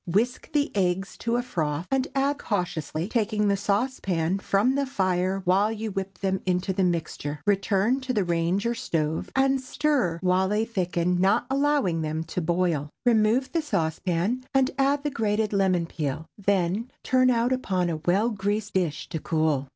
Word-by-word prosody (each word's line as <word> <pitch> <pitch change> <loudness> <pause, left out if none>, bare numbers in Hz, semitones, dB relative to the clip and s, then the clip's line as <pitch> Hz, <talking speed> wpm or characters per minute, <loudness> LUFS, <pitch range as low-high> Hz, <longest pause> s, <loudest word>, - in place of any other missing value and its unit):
Whisk 225 +8 0
the 290 -5 0
eggs 190 0 0
to 230 0 -1
a 245 - 0
froth, 160 -8 -2
and 270 -1 +1
add 280 +1 +1
cautiously, 175 -4 -2
taking 215 -2 0
the 200 - +3
saucepan 195 -4 0
from 205 +6 +2
the 280 0 0
fire 190 -4 0
while 195 +4 +3
you 220 -1 -4
whip 195 -1 -4
them 190 0 -1
into 180 +1 0
the 190 0 +1
mixture. 160 -4 -2
Return 205 +4 +2
to 260 0 -3
the 210 -5 +1
range 175 +3 0
or 235 - +1
stove, 160 -8 -2
and 270 0 +3
stir 260 - 0
while 185 +1 +2
they 210 +2 +1
thicken, 180 -4 0
not 195 +2 +3
allowing 275 - +1
them 155 +1 -2
to 165 +2 -4
boil. 170 -3 0 0.2
Remove 230 +2 +3
the 335 - +1
saucepan, 180 - -1
and 265 -1 +3
add 280 +1 +2
the 295 - -1
grated 215 -3 0
lemon 185 -3 +2
peel; 155 -1 -4
then 200 +3 0
turn 255 0 +3
out 240 +1 +2
upon 185 -8 0
a 165 -2 -1
well 190 +9 +1
greased 205 +1 -2
dish 170 -6 -1
to 160 - -3
cool. 155 -4 0
195 Hz, 175 wpm, -26 LUFS, 175-235 Hz, 0.2 s, the